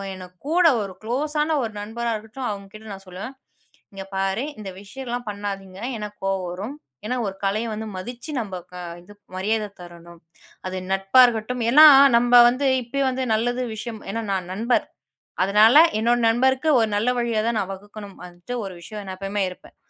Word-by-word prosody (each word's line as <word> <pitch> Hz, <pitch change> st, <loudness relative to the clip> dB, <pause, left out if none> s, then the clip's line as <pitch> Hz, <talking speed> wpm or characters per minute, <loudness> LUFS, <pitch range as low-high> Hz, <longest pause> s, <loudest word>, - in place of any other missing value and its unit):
எனக்கு 180 Hz, -1 st, -12 dB
கூட 350 Hz, 0 st, +5 dB, 0.2 s
ஒரு 195 Hz, -2 st, -7 dB
க்ளோஸான 300 Hz, +6 st, 0 dB
ஒரு 225 Hz, -, -3 dB
நண்பரா 230 Hz, +3 st, -3 dB
இருக்கட்டும், 220 Hz, +4 st, -6 dB
அவங்க 200 Hz, -1 st, -7 dB
கிட்ட 215 Hz, +1 st, -12 dB
நான் 195 Hz, 0 st, -11 dB
சொல்லுவேன். 185 Hz, +8 st, -7 dB, 0.6 s
"இங்க 195 Hz, 0 st, -7 dB
பாரு, 195 Hz, +6 st, -1 dB
இந்த 205 Hz, -2 st, -6 dB
விஷயலா 245 Hz, +4 st, -5 dB
பண்ணாதீங்க. 195 Hz, -2 st, -6 dB, 0.2 s
எனக்கு 210 Hz, -1 st, -7 dB
கோவ 195 Hz, 0 st, 0 dB
வரும். 205 Hz, +10 st, -6 dB, 0.3 s
ஏன்னா, 250 Hz, +4 st, -1 dB
ஒரு 195 Hz, -, -5 dB
கலைய 205 Hz, +4 st, 0 dB
வந்து 220 Hz, +1 st, -5 dB
மதிச்சு, 240 Hz, +9 st, -7 dB
நம்ம 205 Hz, -5 st, -5 dB, 0.2 s
க -, -, -12 dB, 0.3 s
இது 195 Hz, +4 st, -15 dB, 0.2 s
மரியாத 210 Hz, +3 st, -1 dB
தரணும். 170 Hz, -1 st, -13 dB, 0.5 s
அது 185 Hz, 0 st, -4 dB
நட்பா 195 Hz, +6 st, +3 dB
இருக்கட்டும்." 240 Hz, +1 st, -2 dB
ஏன்னா 300 Hz, +6 st, +9 dB, 0.3 s
நம்ம 245 Hz, +1 st, +7 dB
வந்து 255 Hz, +3 st, -1 dB, 0.2 s
இப்பயே 275 Hz, +4 st, -2 dB
வந்து, 260 Hz, 0 st, -2 dB
நல்லது 245 Hz, +3 st, 0 dB
விஷயம் 220 Hz, 0 st, -7 dB
ஏன்னா, 230 Hz, +2 st, -3 dB
நான் 185 Hz, -1 st, -3 dB
நண்பர். 230 Hz, +5 st, +1 dB, 0.6 s
அதனால 210 Hz, +6 st, +6 dB, 0.2 s
என்னோட 240 Hz, +2 st, +2 dB
நண்பருக்கு 260 Hz, +5 st, +2 dB
ஒரு 225 Hz, -1 st, +2 dB
நல்ல 215 Hz, +4 st, +1 dB
வழியா 235 Hz, -2 st, 0 dB
தான் 235 Hz, -1 st, 0 dB
நான் 195 Hz, -1 st, -3 dB
வகுக்கணும். 205 Hz, +1 st, -11 dB
வந்துட்டு 175 Hz, +6 st, -9 dB
ஒரு 190 Hz, -, -6 dB
விஷயம் 210 Hz, +4 st, -8 dB
நான் 190 Hz, -1 st, -7 dB
எப்பவுமே 195 Hz, +1 st, -2 dB
இருப்பேன். 180 Hz, -, -14 dB
215 Hz, 170 wpm, -23 LUFS, 195-245 Hz, 0.6 s, ஏன்னா